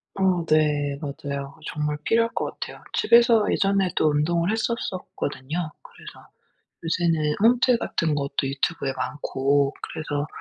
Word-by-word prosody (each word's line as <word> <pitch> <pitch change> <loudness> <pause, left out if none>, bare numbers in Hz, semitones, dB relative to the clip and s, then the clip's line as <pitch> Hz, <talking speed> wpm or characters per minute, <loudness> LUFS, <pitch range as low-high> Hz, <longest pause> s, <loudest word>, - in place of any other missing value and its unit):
어 185 -3 +1
네 150 -2 +2
맞아요. 140 0 -5
정말 150 -1 -2
필요할 230 0 +2
것 - - -1
같아요. - - -7
집에서 235 -2 +5
예전에도 195 -5 +2
운동을 170 +5 +1
했었었거든요. 180 - -3
그래서 - - -14 0.6
요새는 165 -3 +1
홈트 245 +1 +4
같은 160 -8 -1
것도 140 -1 -1
유튜브에 140 0 -1
많고 140 0 0
그래서 145 -2 -3
155 Hz, 295 characters per minute, -24 LUFS, 145-190 Hz, 0.6 s, 집에서